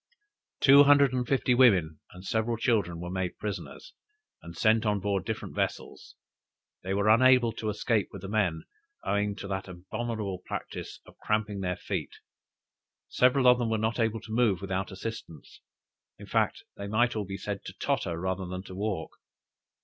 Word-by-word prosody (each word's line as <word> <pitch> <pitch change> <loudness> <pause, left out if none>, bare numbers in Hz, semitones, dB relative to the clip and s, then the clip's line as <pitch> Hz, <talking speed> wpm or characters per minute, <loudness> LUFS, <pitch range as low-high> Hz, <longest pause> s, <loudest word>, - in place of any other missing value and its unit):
Two 140 +1 +8
hundred 140 -2 +5
and 125 -1 -1
fifty 130 -2 +2
women 95 - +4
and 90 +1 -13
several 115 +3 0
children, 105 -8 0
were 90 +1 -6
made 95 -1 -3
prisoners, 105 -1 -6 0.5
and 85 0 -11
sent 110 0 +3
on 105 -2 +1
board 100 -1 -1
different 110 -1 -4
vessels. - - -4 0.7
They 95 - -5
were 100 +1 +1
unable 125 +1 +5
to 110 0 -4
escape 105 0 0
with 100 -2 -10
the - - -5
men, 95 -6 0 0.4
owing 100 0 0
to 100 - -7
that 95 -1 -3
abominable 100 +2 -4
practice - - -6
of - - -18
cramping 105 -1 -1
their 90 -2 -2
feet; - - -4 0.9
several 130 +1 +3
of 125 0 +6
them 120 -2 0
were 110 - +1
not 110 +2 -1
able 115 -1 0
to 110 - -11
move 110 -6 +2
without 95 +1 -3
assistance. 95 -6 -8 0.6
In - - -11
fact, - - 0
they 100 - -5
might 120 +4 +1
all 105 - -1
be 95 +1 -6
said 100 -1 -5
to - - -7
totter, 85 -1 -2
rather 95 +1 -2
than 90 +1 -5
walk. 100 -4 -3
105 Hz, 170 wpm, -28 LUFS, 95-115 Hz, 0.9 s, Two